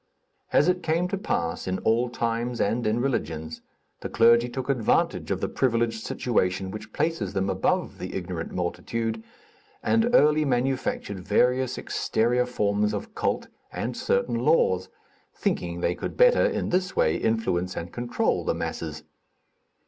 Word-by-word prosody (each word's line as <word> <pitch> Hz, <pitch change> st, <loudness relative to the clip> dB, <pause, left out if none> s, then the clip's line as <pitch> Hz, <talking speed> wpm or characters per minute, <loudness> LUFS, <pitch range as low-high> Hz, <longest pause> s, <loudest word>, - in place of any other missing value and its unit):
As 150 Hz, -, +4 dB
it 180 Hz, 0 st, +2 dB
came 165 Hz, +2 st, +1 dB
to -, -, -1 dB
pass 85 Hz, -, -2 dB
in 95 Hz, 0 st, 0 dB
all 115 Hz, +4 st, +1 dB
times 120 Hz, 0 st, -2 dB
and 115 Hz, +3 st, +1 dB
in 110 Hz, +3 st, +1 dB
religions, 80 Hz, -, -2 dB, 0.4 s
the -, -, -5 dB
clergy 115 Hz, +1 st, +5 dB
took 130 Hz, +1 st, -5 dB
advantage 125 Hz, -6 st, +1 dB
of -, -, -1 dB
the -, -, 0 dB
privileged 115 Hz, -3 st, 0 dB
situation 95 Hz, -5 st, 0 dB
which 110 Hz, -, -8 dB
places 150 Hz, -, -1 dB
them 95 Hz, 0 st, 0 dB
above 95 Hz, 0 st, 0 dB
the -, -, -6 dB
ignorant 90 Hz, -3 st, -4 dB
multitude, 110 Hz, -, -2 dB, 0.6 s
and 230 Hz, +1 st, +3 dB
early 150 Hz, -3 st, +5 dB
manufactured 125 Hz, -6 st, -1 dB
various 125 Hz, +7 st, +1 dB
exterior 125 Hz, +2 st, 0 dB
forms 105 Hz, -3 st, 0 dB
of 100 Hz, -, -6 dB
cult -, -, -1 dB, 0.2 s
and -, -, -3 dB
certain 115 Hz, +4 st, 0 dB
laws, 115 Hz, -, +2 dB, 0.5 s
thinking 85 Hz, 0 st, -2 dB
they 85 Hz, -, +1 dB
could -, -, -6 dB
better, -, -, +6 dB
in -, -, -2 dB
this 185 Hz, +1 st, 0 dB
way, 80 Hz, -, +3 dB
influence 95 Hz, -5 st, 0 dB
and 85 Hz, 0 st, -5 dB
control 120 Hz, 0 st, 0 dB
the -, -, 0 dB
masses. 80 Hz, -2 st, -4 dB
115 Hz, 150 wpm, -26 LUFS, 95-130 Hz, 0.6 s, better